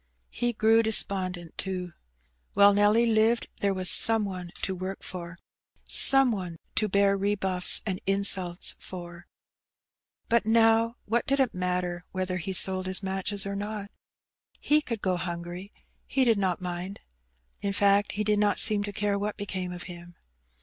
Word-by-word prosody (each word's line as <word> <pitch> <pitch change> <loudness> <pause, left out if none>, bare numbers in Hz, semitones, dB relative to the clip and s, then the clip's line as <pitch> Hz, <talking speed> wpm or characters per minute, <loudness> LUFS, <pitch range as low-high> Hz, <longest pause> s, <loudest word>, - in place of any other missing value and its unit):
He 240 0 -2
grew 225 +1 +3
despondent, 185 -6 +1
too. 180 -3 -4 0.6
While 200 0 +5
Nelly 205 +3 +3
lived 225 +1 +1
there 200 - 0
was 185 -1 -1
some 225 +3 +5
one 180 -3 -7
to 190 - -1
work 185 +1 -7
for^ 170 -2 -8 0.5
some 270 -2 +6
one 180 -6 -6 0.2
to 215 - +2
bear 200 0 +2
rebuffs 190 -2 +1
and 190 -3 -4
insults 195 -3 +3
for; 175 -1 -10 1.0
but 235 0 +2
now 225 +1 +2
what 230 +2 -1
did 275 +1 0
it 265 -3 +1
matter 180 -1 -3
whether 185 -1 -3
he 190 +2 -5
sold 185 0 0
his 185 +1 -3
matches 195 +1 -2
or 200 0 -5
not? 205 0 -6 0.7
He 300 +1 +2
could 230 -7 -6
go 185 -1 0
hungry; 175 +2 -7 0.4
he 265 -1 +1
did 225 -4 +2
not 185 -3 -1
mind. 180 +2 -6 0.6
In 200 - -3
fact, 200 0 +2
he 210 - -2
did 210 0 0
not 205 -1 +1
seem 210 -1 +5
to 205 - -6
care 200 0 -2
what 205 +1 -4
became 185 -3 -5
of 175 0 -8
him. 175 -1 -11
195 Hz, 160 wpm, -26 LUFS, 180-210 Hz, 1.0 s, some